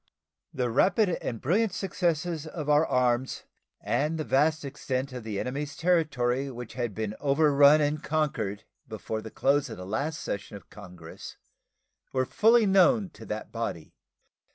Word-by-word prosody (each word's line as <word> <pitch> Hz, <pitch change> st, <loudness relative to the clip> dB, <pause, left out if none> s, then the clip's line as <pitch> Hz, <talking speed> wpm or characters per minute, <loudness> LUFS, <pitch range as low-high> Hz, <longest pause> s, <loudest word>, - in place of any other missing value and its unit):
The 125 Hz, -2 st, -2 dB
rapid 185 Hz, -, +3 dB
and 115 Hz, -, -4 dB
brilliant 195 Hz, -, +1 dB
successes 170 Hz, -4 st, -1 dB
of 155 Hz, -2 st, -6 dB
our 150 Hz, +2 st, +4 dB
arms 125 Hz, 0 st, 0 dB, 0.4 s
and 155 Hz, +3 st, -1 dB
the 155 Hz, -, -2 dB
vast 155 Hz, +2 st, +1 dB
extent 135 Hz, -1 st, -3 dB
of 125 Hz, -2 st, -6 dB
the 105 Hz, -3 st, -4 dB
enemy's 145 Hz, +4 st, -4 dB
territory 140 Hz, -7 st, +1 dB
which 125 Hz, -3 st, -8 dB
had 120 Hz, -5 st, -3 dB
been 110 Hz, -1 st, -3 dB
overrun 145 Hz, +1 st, +5 dB
and 150 Hz, +1 st, 0 dB
conquered 115 Hz, -10 st, -1 dB, 0.2 s
before 110 Hz, 0 st, -5 dB
the 110 Hz, -, -8 dB
close 140 Hz, +5 st, +1 dB
of -, -, -7 dB
the 90 Hz, -, -8 dB
last 140 Hz, +10 st, -2 dB
session 100 Hz, +1 st, -5 dB
of 100 Hz, -, -19 dB
Congress 90 Hz, -5 st, -11 dB, 0.8 s
were 130 Hz, -1 st, +1 dB
fully 225 Hz, -, +4 dB
known 195 Hz, +1 st, +4 dB
to 110 Hz, 0 st, -13 dB
that 105 Hz, +1 st, -5 dB
body. 115 Hz, -9 st, -5 dB
140 Hz, 155 wpm, -27 LUFS, 115-155 Hz, 0.8 s, overrun